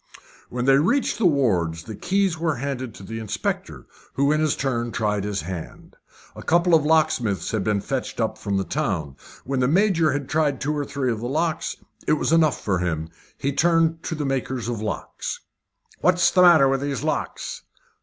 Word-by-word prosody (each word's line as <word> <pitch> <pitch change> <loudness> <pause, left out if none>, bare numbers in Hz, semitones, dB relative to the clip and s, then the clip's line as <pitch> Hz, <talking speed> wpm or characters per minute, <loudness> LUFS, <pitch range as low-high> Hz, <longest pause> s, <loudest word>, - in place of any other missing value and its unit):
When 125 0 -3
they 135 0 +5
reached 240 - +1
the 205 - +5
wards 90 - +1
the 110 +5 -7
keys 195 - +1
were 160 -2 -1
handed 130 -3 -4
to - - -11
the 115 +3 -6
inspector, 110 -3 -4 0.3
who 140 +1 +3
in 155 - +2
his 155 -1 +2
turn 120 -3 -1
tried 105 -3 -1
his 105 -4 -2
hand. 85 0 -8 0.4
A - - -8
couple 175 +1 +2
of 160 -3 +6
locksmiths 150 - +1
had 110 -3 -1
been 105 -1 0
fetched 135 +5 -4
up 110 -1 0
from 100 -2 -2
the 95 - 0
town. 95 - -2 0.3
When 135 0 -1
the 125 - +3
Major 170 -1 +3
had 140 -2 -3
tried 150 -3 +1
two 150 +2 -1
or 145 -1 -2
three 135 -3 -1
of 110 - -3
the 120 +2 -4
locks 160 +3 -1 0.3
it - - +4
was 155 - 0
enough 160 -4 +3
for 95 -4 -1
him. 80 -2 -2 0.3
He 140 - -1
turned 165 0 +2
to 165 - -2
the 150 -1 -3
makers 130 -3 -2
of 120 -3 -3
locks. 110 - -4 0.6
"What's 180 -1 +3
the 180 - +4
matter 170 -6 +7
with 135 0 +1
these 140 -3 -3
locks?" - - -3
135 Hz, 195 wpm, -23 LUFS, 110-155 Hz, 0.6 s, matter